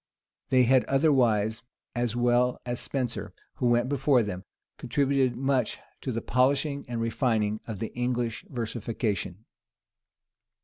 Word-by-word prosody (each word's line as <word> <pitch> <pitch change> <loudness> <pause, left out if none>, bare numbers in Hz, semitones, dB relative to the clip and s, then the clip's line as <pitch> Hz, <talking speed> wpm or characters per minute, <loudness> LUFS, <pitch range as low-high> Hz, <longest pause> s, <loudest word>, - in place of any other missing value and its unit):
They 130 -1 +5
had, 130 +1 +4
otherwise, 120 -7 +2 0.3
as 120 -2 -1
well 120 +1 +2
as 120 -1 -3
Spenser, 125 -4 -4 0.2
who 125 - +1
went 120 +1 +3
before 135 -2 +3
them, 95 -2 -5 0.3
contributed 135 -2 +1
much 135 +1 0 0.2
to 130 - -3
the 115 -1 -3
polishing 140 +3 +1
and 120 -1 -3
refining 115 -2 0
of 110 -3 -4
the 110 - -5
English 125 -2 -1
versification. 110 -4 -3
120 Hz, 125 wpm, -27 LUFS, 115-130 Hz, 0.3 s, They